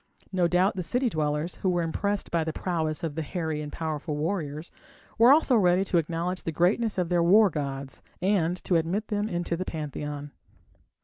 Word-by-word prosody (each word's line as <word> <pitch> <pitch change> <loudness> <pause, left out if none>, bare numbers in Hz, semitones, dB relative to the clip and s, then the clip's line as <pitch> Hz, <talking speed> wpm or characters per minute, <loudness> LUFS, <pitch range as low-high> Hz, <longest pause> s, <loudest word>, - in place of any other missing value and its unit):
No 180 -3 +2
doubt 180 +4 +2
the 185 - -2
city 245 +8 0
dwellers, 150 +2 -1
who 190 - 0
were 175 -1 +1
impressed 200 +5 -2
by 170 -1 +1
the 160 - -2
prowess 160 -3 -2
of 160 -3 -2
the 160 - -3
hairy 160 -1 -3
and 150 -1 -6
powerful 155 -1 -3
warriors, 155 -1 -3 0.5
were 235 +3 +8
also 285 -3 +5
ready 185 -2 +3
to 180 -2 +2
acknowledge 170 +3 -2
the 165 - -3
greatness 195 +7 +1
of 180 -2 0
their 175 -1 +2
war 195 +4 +6
gods, 140 -2 -5 0.2
and 180 -2 +1
to 175 - +2
admit 180 +7 -1
them 210 0 -1
into 175 -1 -2
the 180 - -3
pantheon. 150 -3 -5
170 Hz, 190 wpm, -27 LUFS, 155-190 Hz, 0.5 s, were